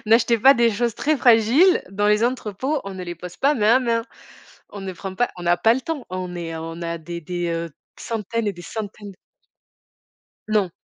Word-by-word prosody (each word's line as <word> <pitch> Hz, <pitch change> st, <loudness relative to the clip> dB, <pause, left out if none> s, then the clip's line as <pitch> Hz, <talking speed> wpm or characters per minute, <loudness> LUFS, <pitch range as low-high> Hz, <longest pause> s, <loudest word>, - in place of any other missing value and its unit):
n'achetez 230 Hz, +1 st, +4 dB
pas 270 Hz, +5 st, +7 dB
des 235 Hz, -2 st, +3 dB
choses 230 Hz, +1 st, -1 dB
très 310 Hz, +1 st, +1 dB
fragiles 245 Hz, -, +5 dB
dans 205 Hz, +1 st, 0 dB
les 210 Hz, +2 st, +3 dB
entrepôts. 255 Hz, +4 st, -2 dB
On 195 Hz, -, -6 dB
ne 185 Hz, -, -6 dB
les 175 Hz, 0 st, -5 dB
pose 175 Hz, +1 st, -10 dB
pas, 285 Hz, +2 st, +2 dB
main 225 Hz, -1 st, +4 dB
à -, -, +5 dB
main. 230 Hz, -2 st, 0 dB, 0.7 s
On 200 Hz, -, -9 dB
ne 190 Hz, -1 st, -5 dB
prend 190 Hz, +1 st, -7 dB
pas, 245 Hz, -, +1 dB
on 175 Hz, -, -7 dB
a 175 Hz, 0 st, +3 dB
pas 225 Hz, +6 st, +4 dB
le 260 Hz, -, -3 dB
temps. 315 Hz, -4 st, -4 dB
On 185 Hz, -1 st, -5 dB
est, 165 Hz, -1 st, -5 dB
on 165 Hz, +1 st, -6 dB
a 170 Hz, 0 st, -3 dB
des 170 Hz, +1 st, -7 dB
des, 175 Hz, +2 st, -3 dB
heu, 165 Hz, 0 st, -3 dB, 0.3 s
centaines 225 Hz, 0 st, -3 dB
et 205 Hz, -, -1 dB
des 175 Hz, -, -11 dB
centaines 205 Hz, +1 st, -7 dB
d 190 Hz, -, -18 dB, 1.3 s
Non. 205 Hz, -5 st, +1 dB
210 Hz, 215 wpm, -22 LUFS, 175-235 Hz, 1.3 s, pas